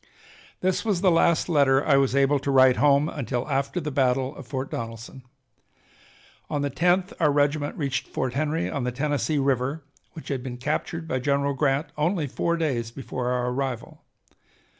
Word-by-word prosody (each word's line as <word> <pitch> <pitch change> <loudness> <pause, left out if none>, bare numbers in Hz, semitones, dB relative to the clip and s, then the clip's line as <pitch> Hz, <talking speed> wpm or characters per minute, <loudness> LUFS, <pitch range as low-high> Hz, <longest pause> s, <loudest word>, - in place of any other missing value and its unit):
This 185 0 0
was 205 -6 0
the 190 -2 +4
last 165 0 +3
letter 140 -4 +3
I 145 - +4
was 135 -1 +2
able 140 +1 +3
to 140 - -4
write 130 -2 +5
home 145 0 +4
until 130 -5 -3
after 140 +4 -1
the 150 -3 -4
battle 130 +1 +1
of 135 - -11
Fort 130 +1 -4
Donelson. 115 +3 -6 1.3
On 145 -1 -1
the 140 - -1
10th 180 +5 +1
our 150 -3 +3
regiment 145 +1 0
reached 140 -4 -2
Fort 130 -1 -3
Henry 155 +3 -1
on 140 - -3
the 125 - -1
Tennessee 145 +3 -1
River 135 +2 0 0.3
which 160 - -10
had 135 -3 -2
been 125 -1 -6
captured 155 +5 -3
by 130 - -1
General 140 +1 +1
Grant 140 +2 0
only 165 +1 +1
four 170 +5 -1
days 130 -8 -1
before 125 0 -5
our 125 0 0
arrival. 130 -2 -4
140 Hz, 175 wpm, -25 LUFS, 130-155 Hz, 1.3 s, write